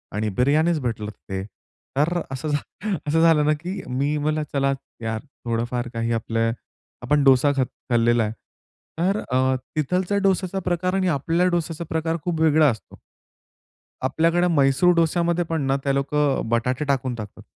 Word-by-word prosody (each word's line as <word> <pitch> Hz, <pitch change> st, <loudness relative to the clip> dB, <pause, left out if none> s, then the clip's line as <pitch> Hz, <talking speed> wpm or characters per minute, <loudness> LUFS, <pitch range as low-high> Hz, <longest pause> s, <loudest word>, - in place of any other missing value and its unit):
आणि 105 Hz, +1 st, 0 dB
बिर्याणीच 155 Hz, +6 st, +3 dB
भेटलं 110 Hz, -4 st, -3 dB
तिथे, 95 Hz, -2 st, -6 dB, 0.5 s
तर 170 Hz, +5 st, +2 dB
असं 135 Hz, +3 st, -4 dB, 0.6 s
असं 160 Hz, +2 st, +2 dB
झालं 165 Hz, -3 st, +5 dB
ना 150 Hz, -, +4 dB
की 185 Hz, +3 st, -4 dB
मी 140 Hz, +4 st, 0 dB
मला 155 Hz, +1 st, 0 dB
चला 135 Hz, -1 st, +2 dB, 0.3 s
यार 110 Hz, -1 st, -3 dB, 0.2 s
थोडंफार 120 Hz, +1 st, -1 dB
काही 115 Hz, 0 st, -1 dB
आपले 115 Hz, 0 st, 0 dB, 0.5 s
आपण 145 Hz, +3 st, +2 dB
डोसा 135 Hz, +1 st, +5 dB
खात 130 Hz, -, +2 dB, 0.2 s
खाल्लेला 120 Hz, -1 st, +3 dB
आहे. 105 Hz, -, -2 dB, 0.7 s
तर 195 Hz, +4 st, +2 dB
अ, 130 Hz, +1 st, +2 dB, 0.2 s
तिथलच्या 180 Hz, +6 st, 0 dB
डोस्याचा 190 Hz, 0 st, +1 dB
प्रकार 180 Hz, +1 st, 0 dB
आणि 190 Hz, -1 st, +1 dB
आपल्या 165 Hz, +3 st, +1 dB
डोस्याचा 170 Hz, -1 st, -2 dB
प्रकार 165 Hz, +1 st, -1 dB
खूप 175 Hz, -3 st, -2 dB
वेगळा 155 Hz, -1 st, +5 dB
असतो. 110 Hz, -4 st, -7 dB, 1.0 s
आपल्याकडे 165 Hz, +6 st, +2 dB
म्हैसूर 150 Hz, +2 st, +4 dB
डोस्यामध्ये 170 Hz, +1 st, +2 dB
पण 160 Hz, -2 st, -2 dB
ना 135 Hz, -, +2 dB
ते 140 Hz, -, +2 dB
लोकं 140 Hz, 0 st, +1 dB
बटाटे 125 Hz, +5 st, 0 dB
टाकून 130 Hz, -3 st, 0 dB
टाकतात 110 Hz, -3 st, -9 dB
145 Hz, 150 wpm, -23 LUFS, 125-165 Hz, 1.0 s, झालं